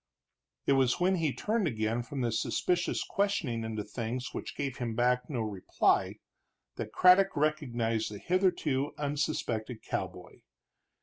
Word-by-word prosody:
It 140 - +4
was 135 +1 +3
when 185 +1 +3
he 160 -4 +1
turned 215 - 0
again 110 -2 -1
from 135 +2 -5
this 115 -2 0
suspicious 175 -1 0
questioning 175 - -1
into 110 -1 -3
things 115 +4 -4
which - - -6
gave 140 -3 -3
him 115 -3 -3
back 125 +1 +2
no 125 -6 -2
reply, 105 -4 +1 0.6
that - - -4
Craddock 185 0 +5
recognized 120 -7 0
the 105 - -6
hitherto 170 - +1
unsuspected 140 -6 -2
cowboy. - - -5
130 Hz, 135 wpm, -30 LUFS, 115-160 Hz, 0.6 s, Craddock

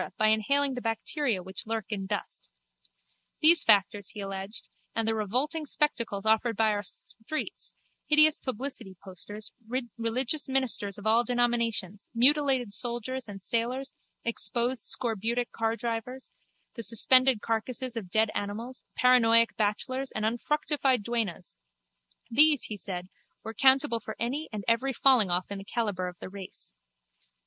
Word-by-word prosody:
by 215 0 +3
inhaling 275 +6 +3
the 250 - -5
bacteria 225 - -1
which 190 +3 -6
lurk 225 -1 -2
in 195 -3 -4
dust. 205 - -5 0.9
These 330 +2 +7
factors, 205 -1 +3
he 210 - -8
alleged, 195 +1 -6 0.3
and 225 0 0
the 225 - +2
revolting 255 - -1
spectacles 235 -9 -1
offered 220 0 +2
by 220 -1 +3
our 205 -1 -1
streets, 220 +8 -6 0.3
hideous 305 0 +6
publicity 250 -6 -5
posters, 205 +3 -9 0.5
religious 250 +6 -1
ministers 255 -7 +1
of 205 - -11
all 225 +2 +4
denominations, 235 -5 0
mutilated 260 -3 +3
soldiers 240 +3 -4
and 195 -2 -10
sailors, 250 +5 -2 0.3
exposed 235 +1 0
scorbutic 235 +1 -1
cardrivers, 230 +3 -3 0.4
the 235 - -7
suspended 255 +3 +5
carcases 240 +3 -2
of 210 -6 -6
dead 220 +3 +2
animals, 225 +6 -5 0.2
paranoic 230 -2 +5
bachelors 255 +6 -1
and 215 - -2
unfructified 265 +1 0
duennas—these, 175 - -1
he 215 - -4
said, 185 -3 -5 0.4
were 220 - -5
accountable 265 0 +4
for 220 0 -8
any 270 +7 -3
and 210 -2 -5
every 245 +4 +1
fallingoff 205 -10 +3
in 200 - -4
the - - -8
calibre 200 -4 -2
of 180 - -13
the - - -8
race. 190 0 -4
230 Hz, 135 wpm, -28 LUFS, 205-255 Hz, 0.9 s, These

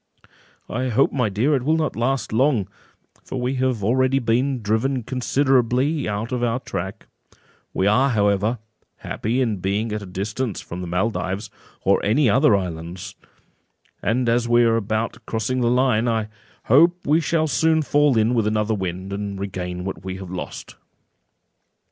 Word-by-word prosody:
"I 130 +3 -2
hope, 130 +4 +3
my 125 -6 0
dear, 115 +10 +1
it 130 - 0
will 155 +5 +2
not 155 -2 -1
last 125 +1 -1
long, 120 -4 +2 0.6
for 130 - -5
we 125 +2 -1
have 125 -5 0
already 130 +5 +2
been 125 +1 0
driven 115 +5 0
considerably 130 +2 +1
out 105 +4 -3
of 125 -1 -1
our 120 +1 +1
track; 95 -3 -6 0.7
we 95 - 0
are, 125 +7 +4
however, 105 0 +1 0.4
happy 120 +5 -2
in 115 -5 0
being 100 +4 -1
at 105 0 -3
a 100 - -8
distance 105 +5 -3
from 90 +2 -7
the 90 - -5
Maldives, 95 +2 -2 0.3
or - - +3
any 125 +7 +3
other 135 0 +5
islands; 90 0 -5 0.9
and 120 +4 0
as 120 0 +1
we 120 0 +5
are 115 -1 +3
about 115 +2 -2
crossing 115 +3 -1
the 120 - +2
line, 125 -2 +2
I 110 -2 0 0.3
hope 170 +8 +4
we 155 +3 +3
shall 160 0 +1
soon 160 +1 +2
fall 145 -3 +3
in 110 +2 +3
with 115 -3 +1
another 110 0 0
wind, 95 -1 -4
and 100 -1 -4
regain 90 -2 -4
what 95 - -5
we 95 0 -5
have 95 -2 -8
lost." 90 - -7
115 Hz, 165 wpm, -22 LUFS, 100-130 Hz, 0.9 s, other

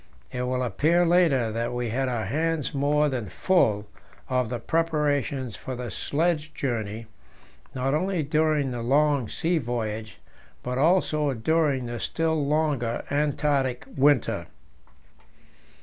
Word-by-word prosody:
It 125 - -3
will 125 0 -1
appear 155 - +2
later 165 -10 +3
that 115 +2 -2
we 120 -1 -2
had 130 +3 0
our 115 -4 -2
hands 155 +4 -1
more 145 +2 +2
than 125 -8 -3
full 105 - +2 0.4
of 125 -3 0
the 120 - -2
preparations 145 - 0
for 130 - -6
the 120 -2 -5
sledge 155 - -1
journey, 115 -4 -3 0.7
not 135 +1 0
only 180 +1 0
during 150 -1 +1
the 120 -1 -4
long 140 -1 +2
sea 170 0 0
voyage, 110 -4 -4 0.5
but 125 +1 -2
also 155 -3 +2
during 140 +1 +1
the 120 0 -5
still 160 +1 0
longer 140 -5 0
Antarctic 140 -3 0
winter. 140 -2 +2
135 Hz, 130 wpm, -26 LUFS, 120-155 Hz, 0.7 s, later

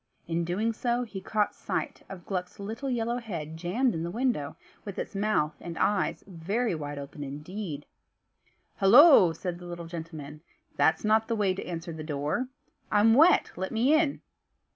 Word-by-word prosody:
In 165 0 -1 0.3
so 240 +1 0
doing 245 0 -1
he 200 -4 -7
caught 210 0 0
sight - - -4
of 185 -3 -9
Gluck's 180 +1 -4
little 225 +7 -4
yellow 235 -1 -1
head 165 -9 -6
jammed 195 +10 0
in 160 - -3
the 170 - -3
window, 225 - -1 0.3
with 200 -2 -7
its - - -4
mouth 195 -7 +1
and 170 -1 -7
eyes 205 -2 +1
very 195 +6 -2
wide 145 -2 -5
open 140 +1 -7
indeed. 150 +2 -6 0.9
"Hollo!" 225 - +8
said 175 +1 -5
the 175 - -10
little 175 -1 -6
gentleman, 160 -3 -8 0.3
"that's 160 +5 +2
not 220 +1 +3
the 230 - 0
way 200 -3 +1
to 190 - -5
answer 170 -1 -5
the 155 -1 -7
door. 150 - -2 0.4
I'm 210 +2 +5
wet, 315 +9 +5
let 190 +2 -4
me 240 +6 +3
in." 310 -2 +2
190 Hz, 170 wpm, -28 LUFS, 160-225 Hz, 0.9 s, Hollo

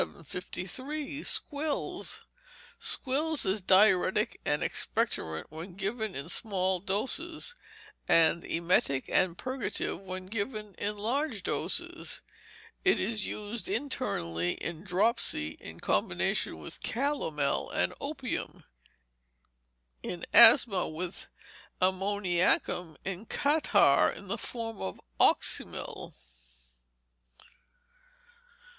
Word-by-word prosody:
753. 275 - -4
Squills 295 +1 -2 0.6
Squills 300 +4 0
is 195 +2 0
diuretic 190 +2 +4
and 150 0 +1
expectorant 80 0 0
when 165 +4 -8
given 210 +2 -3
in 140 +3 -5
small 190 -1 +1
doses; 290 - -2 0.5
and 165 +1 +5
emetic 165 -5 +1
and 180 -2 +3
purgative 260 0 -2
when 185 -1 -6
given 210 +1 -4
in 210 +1 -2
large 270 +9 -1
doses. - - -2 0.6
It 385 - +4
is 210 +1 0
used 215 - -4
internally 90 - -1
in 170 0 -5
dropsy, 185 - +1
in - - -9
combination - - 0
with 75 - -9
calomel 225 - -1
and - - 0
opium; - - -4 1.4
in 175 - -4
asthma, 230 -5 +8
with 170 +3 -5 0.5
ammoniacum; 185 -3 +1
in 195 +3 -5
catarrh, 295 +2 +4
in - - -9
the - - -2
form 225 -2 -5
of 95 -1 -4 0.2
oxymel. - - +2
195 Hz, 90 wpm, -30 LUFS, 175-245 Hz, 1.4 s, asthma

